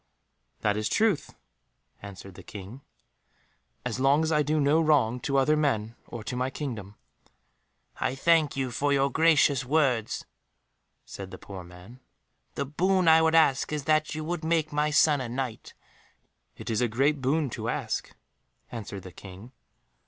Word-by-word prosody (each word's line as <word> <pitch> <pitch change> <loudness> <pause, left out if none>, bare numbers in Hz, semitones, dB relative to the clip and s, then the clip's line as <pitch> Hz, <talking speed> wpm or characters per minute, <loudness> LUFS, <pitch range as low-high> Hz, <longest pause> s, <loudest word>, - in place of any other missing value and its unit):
"That 105 -1 +1
is 105 0 -1
truth," 215 -7 +1 0.7
answered 100 -1 -10
the - - -12
King, 105 +6 -10 1.0
"as 125 0 -3
long 140 +4 +3
as 160 - 0
I 150 -1 +3
do 150 +1 0
no 150 +3 +3
wrong 135 -7 +2
to 140 +2 -1
other 135 +3 +3
men 115 -7 0
or 115 -2 -7
to 125 - -5
my 130 +1 -1
kingdom." 115 -9 -6 1.0
"I 130 - -1
thank 155 0 +2
you 130 -2 -1
for 145 +4 0
your 140 0 +2
gracious 150 -4 +4
words," 130 -5 0 0.8
said 95 -1 -8
the - - -9
poor 95 -2 -9
man; 90 +8 -14 0.6
"the - - -2
boon 185 +5 +1
I 160 0 +7
would 160 0 +3
ask 155 -4 +3
is 150 -2 -2
that 155 +1 +1
you 155 - -4
would 170 +1 -3
make 160 -2 0
my 150 +1 +1
son 150 -1 +4
a 125 - -4
Knight." 125 -2 -5 0.8
"It - - -5
is 110 - 0
a 120 - +3
great 135 +5 +1
boon 140 +1 0
to - - -4
ask," - - -3 0.6
answered 105 -5 -7
the 95 - -10
King. 95 +6 -12
135 Hz, 165 wpm, -27 LUFS, 115-155 Hz, 1.0 s, I